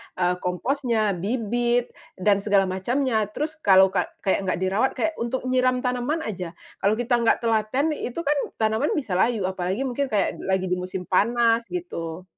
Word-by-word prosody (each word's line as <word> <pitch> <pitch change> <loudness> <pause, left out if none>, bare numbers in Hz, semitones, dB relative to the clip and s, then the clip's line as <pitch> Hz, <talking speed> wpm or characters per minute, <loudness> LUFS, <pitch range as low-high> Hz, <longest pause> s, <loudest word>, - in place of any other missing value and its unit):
eee, 180 0 0
komposnya, 220 +3 0
bibit, 240 +3 0 0.2
dan 200 +1 +2
segala 200 -1 +3
macamnya. 220 +4 0
Terus 305 +8 -5
kalau 190 -5 +6
ka - - 0 0.2
kayak 195 0 0
nggak 180 - 0
dirawat, 200 +8 +1
kayak 320 - 0
untuk 240 +3 -2
nyiram 255 0 +1
tanaman 250 +6 -1
aja, 180 -5 -5 0.2
kalau 205 +2 +2
kita 240 +1 +1
nggak 235 +1 +2
telaten, 230 +7 +1
itu 270 0 -4
kan 295 0 +1 0.2
tanaman 220 +6 +1
bisa 205 - -1
layu. 225 -3 +2
Apalagi 190 +5 -2
mungkin 270 +2 -1
kayak 210 -5 0
d - - -7
lagi 190 -1 +1
di 180 - +1
musim 180 0 -5
panas 230 +4 +2
gitu. 175 -1 -5
220 Hz, 170 wpm, -24 LUFS, 190-250 Hz, 0.2 s, kalau